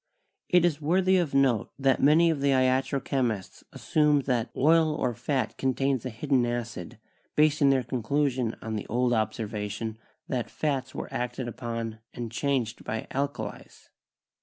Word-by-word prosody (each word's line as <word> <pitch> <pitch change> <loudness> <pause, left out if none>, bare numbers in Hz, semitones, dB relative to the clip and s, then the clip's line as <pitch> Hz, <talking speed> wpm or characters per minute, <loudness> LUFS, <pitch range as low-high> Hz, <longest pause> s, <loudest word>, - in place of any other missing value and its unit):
It 180 -1 +5
is 155 -3 0
worthy 185 +5 +3
of 165 -6 0
note 130 -6 +3
that 135 -1 +2
many 160 +4 +5
of 150 -4 -3
the 140 - +2
iatro 130 +1 +1
chemists 115 -8 -2
assumed 150 -2 +2
that 125 -3 0
"oil 160 +2 +4
or 125 -5 -1
fat 125 +3 -2
contains 135 -1 0
a - - -3
hidden 130 +2 +1
acid," 120 -7 -4 0.4
basing 150 -2 +4
their 135 -2 +3
conclusion 125 0 -1
on 110 0 -3
the 105 - -4
old 120 +2 +1
observation 110 0 -3 0.3
that 125 -3 -2
fats 135 -4 -2
were - - -6
acted 125 0 -3
upon 115 -2 -5 0.2
and 120 -2 -5
changed 125 -2 -1
by 110 +1 -4
alkalies. 140 +1 -5
130 Hz, 150 wpm, -27 LUFS, 115-145 Hz, 0.4 s, It